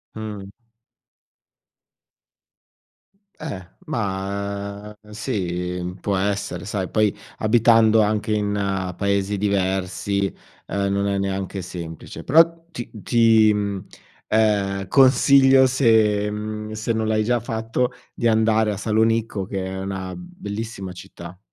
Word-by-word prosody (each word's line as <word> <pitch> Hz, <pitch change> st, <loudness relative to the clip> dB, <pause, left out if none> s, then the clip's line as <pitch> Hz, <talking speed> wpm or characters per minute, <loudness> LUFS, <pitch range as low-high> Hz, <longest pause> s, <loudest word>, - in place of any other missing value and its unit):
Mh. 105 Hz, -3 st, -6 dB, 2.9 s
Eh, 95 Hz, -2 st, -6 dB, 0.2 s
ma, 100 Hz, 0 st, -4 dB
ehm, 105 Hz, 0 st, -17 dB
sì, 90 Hz, -6 st, -3 dB
mhmm, 90 Hz, +1 st, -4 dB
può 100 Hz, -2 st, 0 dB
essere, 100 Hz, +1 st, -2 dB
sai 95 Hz, -3 st, -3 dB
poi 110 Hz, -2 st, +2 dB, 0.2 s
abitando 115 Hz, 0 st, +4 dB
anche 105 Hz, 0 st, 0 dB
in 105 Hz, -1 st, 0 dB, 0.5 s
paesi 100 Hz, 0 st, 0 dB
diversi, 95 Hz, 0 st, 0 dB, 0.4 s
ehm, 100 Hz, +1 st, -1 dB
non 100 Hz, 0 st, 0 dB
è 100 Hz, 0 st, 0 dB
neanche 95 Hz, 0 st, -3 dB
semplice, 85 Hz, -2 st, -8 dB
però 165 Hz, +3 st, +4 dB
ti 120 Hz, -8 st, -7 dB
ti, 110 Hz, 0 st, +4 dB
mhmm, 100 Hz, -2 st, -3 dB, 0.4 s
ehm, 100 Hz, -3 st, +1 dB
consiglio 135 Hz, 0 st, +6 dB
se, 110 Hz, -5 st, +3 dB
mhmm 105 Hz, +1 st, -5 dB
se 110 Hz, +2 st, -2 dB
non 110 Hz, -1 st, 0 dB
l'hai 110 Hz, 0 st, +1 dB
già 120 Hz, +2 st, +1 dB
fatto, 115 Hz, +2 st, -2 dB, 0.2 s
di 120 Hz, -, 0 dB
andare 110 Hz, -1 st, +3 dB
a -, -, -6 dB
Salonicco 110 Hz, -1 st, 0 dB
che 95 Hz, 0 st, -4 dB
è 95 Hz, 0 st, -5 dB
una 95 Hz, -1 st, -4 dB
bellissima 110 Hz, -, -6 dB
città. 90 Hz, 0 st, -11 dB
105 Hz, 115 wpm, -22 LUFS, 100-110 Hz, 2.9 s, consiglio